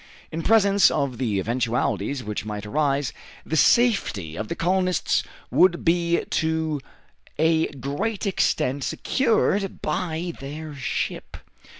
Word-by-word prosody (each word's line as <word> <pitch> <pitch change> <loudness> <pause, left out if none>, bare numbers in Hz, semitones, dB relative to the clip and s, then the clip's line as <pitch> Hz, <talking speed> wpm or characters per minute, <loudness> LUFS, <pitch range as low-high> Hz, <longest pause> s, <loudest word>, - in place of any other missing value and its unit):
In 165 - -3
presence 200 0 +5
of 140 -5 -1
the 110 -6 0
eventualities 120 +2 -1
which 105 -1 -4
might 105 -1 -5
arise, 140 +2 0 0.3
the 160 - -2
safety 160 - +3
of 110 +4 -4
the - - -3
colonists 185 +1 +1 0.3
would 175 -1 +3
be 170 0 +2
to 160 -2 0 0.6
a 160 +1 +3
great 145 - -3
extent 145 -7 0
secured 210 - 0
by 170 +1 -2
their 150 +3 -7
ship. 135 -3 -4
155 Hz, 115 wpm, -24 LUFS, 130-180 Hz, 0.6 s, presence